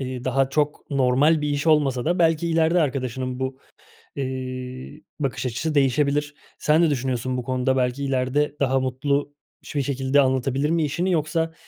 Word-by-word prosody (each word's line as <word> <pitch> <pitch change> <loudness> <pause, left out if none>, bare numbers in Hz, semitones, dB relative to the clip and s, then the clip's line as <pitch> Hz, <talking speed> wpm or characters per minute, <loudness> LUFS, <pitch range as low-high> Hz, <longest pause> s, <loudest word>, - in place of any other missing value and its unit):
Eee, 130 -1 -5
daha 130 +1 +1
çok 150 +1 -1
normal 140 +3 +3
bir 150 - 0
iş 145 +2 -2
olmasa 140 -6 +3
da 175 +2 +1
belki 165 0 +2
ileride 165 +2 +3
arkadaşının 130 -3 -2
bu, 130 0 -3 0.6
eee, 130 +1 -5 0.2
bakış 135 -2 -2
açısı 140 +6 -2
değişebilir. 145 +2 +1 0.2
Sen 155 +2 +3
ne 170 - +4
düşünüyorsun 130 -2 -1
bu 125 - -3
konuda 130 +1 0
belki 125 +2 0
ileride 135 +2 0
daha 135 -1 +2
mutlu 140 +3 -1 0.3
biş - - -10
bir 145 - +2
şekilde 135 +1 +2
anlatabilir 130 +2 0
mi 165 0 +1
işini 170 +6 -1
yoksa, 160 0 0
135 Hz, 165 wpm, -23 LUFS, 130-150 Hz, 0.6 s, ne